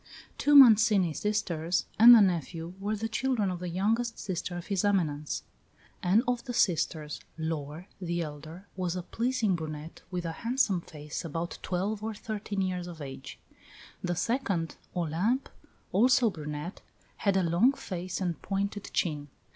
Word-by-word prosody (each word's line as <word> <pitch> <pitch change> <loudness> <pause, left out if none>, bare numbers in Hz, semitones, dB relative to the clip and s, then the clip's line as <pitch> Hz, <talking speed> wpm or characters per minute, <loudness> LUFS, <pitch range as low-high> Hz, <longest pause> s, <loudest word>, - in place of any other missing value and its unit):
Two 290 0 +4
Mancini 220 - +7
sisters 175 -4 -1
and 240 +2 +11
the 225 - +7
nephew 170 -2 0
were 205 +2 -1
the 220 +2 -3
children 225 -4 0
of 180 - -4
the 180 0 -4
youngest 225 +7 0
sister 175 -1 -4
of 175 - -7
his 195 -3 -1
Eminence; 155 -8 0 0.6
and 195 +6 +3
of 245 -1 0
the 245 -2 -4
sisters 155 -6 0 0.2
Laure, 160 +1 -4
the 170 -1 -1
elder, 155 +4 -9
was 180 -2 -2
a 180 - -3
pleasing 230 -2 0
brunette 155 -1 -7
with 180 -2 -3
a 165 - -2
handsome 230 -1 0
face, 150 -2 -7
about 165 +1 -4
twelve 195 +4 -2
or 220 0 -4
thirteen 205 -2 -4
years 180 -1 -2
of 170 -2 -9
age; 135 -2 -8 0.7
the 175 -1 -1
second 190 -5 -1 0.2
(Olympe), 180 - 0 0.4
also 240 +3 +4
a - - -6
brunette, 150 +1 -6 0.4
had 200 -2 +1
a 190 - +2
long 175 +10 +4
face 185 -7 -5
and 175 -3 -2
pointed 200 +1 -3
chin. 150 -4 -1
180 Hz, 155 wpm, -29 LUFS, 165-215 Hz, 0.7 s, and